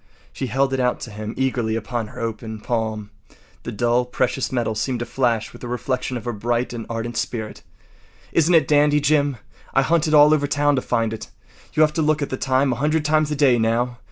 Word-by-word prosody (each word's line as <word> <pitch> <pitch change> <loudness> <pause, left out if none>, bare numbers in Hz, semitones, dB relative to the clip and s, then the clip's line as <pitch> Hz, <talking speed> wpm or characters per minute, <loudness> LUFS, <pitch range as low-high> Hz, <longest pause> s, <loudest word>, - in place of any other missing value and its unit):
She 135 - -3
held 135 +1 +1
it 135 - 0
out 125 -1 +1
to 115 - -7
him 105 +1 -6
eagerly 125 -4 0
upon 115 0 -3
her - - -11
open 110 -1 -4
palm. 110 -2 -3 0.5
The - - -6
dull 120 +2 +1
precious 125 +1 -1
metal 120 -3 0
seemed 120 +4 -2
to - - -2
flash 120 -4 -1
with - - -13
a - - -4
reflection 125 +1 -2
of 120 - -9
her 120 - -2
bright 120 +3 -1
and 115 -2 -6
ardent 115 +1 -4
spirit. 110 -1 -4 0.7
“Isn’t 165 +2 +3
it 160 - +6
a - - -13
dandy, 150 0 +4
Jim? 145 -2 +2 0.4
I 135 - +5
hunted 160 +1 +2
all 150 +1 +7
over 145 -2 +1
town 145 0 +2
to 130 - 0
find 115 -3 0
it. 110 - -7 0.4
You’ll 155 0 +5
have 155 - -4
to 160 - 0
look 155 -1 +1
at - - -5
the - - 0
time 130 0 +1
a - - -5
hundred 150 +3 0
times 155 0 +2
a 150 - -1
day 135 -4 +4
now. 120 +2 0
125 Hz, 225 wpm, -22 LUFS, 115-145 Hz, 0.7 s, all